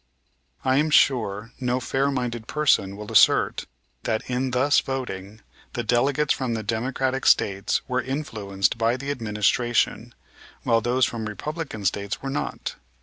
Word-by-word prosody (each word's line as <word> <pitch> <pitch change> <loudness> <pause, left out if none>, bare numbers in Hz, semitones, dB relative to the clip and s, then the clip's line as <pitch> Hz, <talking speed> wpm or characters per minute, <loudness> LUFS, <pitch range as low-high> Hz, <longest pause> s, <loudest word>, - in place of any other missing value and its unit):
I 130 0 +3
am 155 +2 +2
sure 115 -7 +2
no 125 -1 0
fair 135 +2 0
minded 120 -4 -3
person 115 -10 +2
will 105 0 -8
assert - - +4 0.3
that, 110 -1 -2
in 130 +1 -1
thus 130 +3 +3
voting, 110 -6 -5 0.3
the 120 - -2
delegates 135 +6 +2
from 125 -3 -2
the 110 - -3
Democratic 130 +4 -1
States 100 -1 +2
were 125 0 0
influenced 110 -8 -2
by 115 +2 +2
the 140 +2 -4
administration, 115 -1 0 0.5
while 115 0 +3
those 125 +2 +2
from 115 -2 -4
Republican 110 - -5
States 100 +2 -1
were 135 - -5
not. 70 - -4
120 Hz, 145 wpm, -24 LUFS, 105-135 Hz, 0.5 s, assert